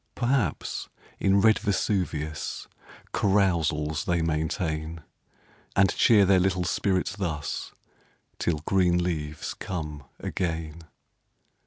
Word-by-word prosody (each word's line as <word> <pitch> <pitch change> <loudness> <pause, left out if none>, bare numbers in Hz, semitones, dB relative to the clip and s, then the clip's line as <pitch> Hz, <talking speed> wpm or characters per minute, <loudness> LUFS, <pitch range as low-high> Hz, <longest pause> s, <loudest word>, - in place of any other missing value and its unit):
Perhaps, 130 +2 -1 0.3
in 95 +1 +4
red 110 0 +5
Vesuvius 95 -7 -1 0.5
Carousals 80 -7 +1
they 85 -1 +1
maintain; 80 0 -2 0.7
And 100 -1 +4
cheer 105 -4 +6
their 95 0 +5
little 90 -1 +1
spirits 95 +1 0
thus, 80 -8 -3 0.7
Till 80 -4 0
green 90 -2 +3
leaves 75 -4 -3
come 75 -6 -5
again. 80 -2 -3
85 Hz, 95 wpm, -27 LUFS, 80-95 Hz, 0.7 s, cheer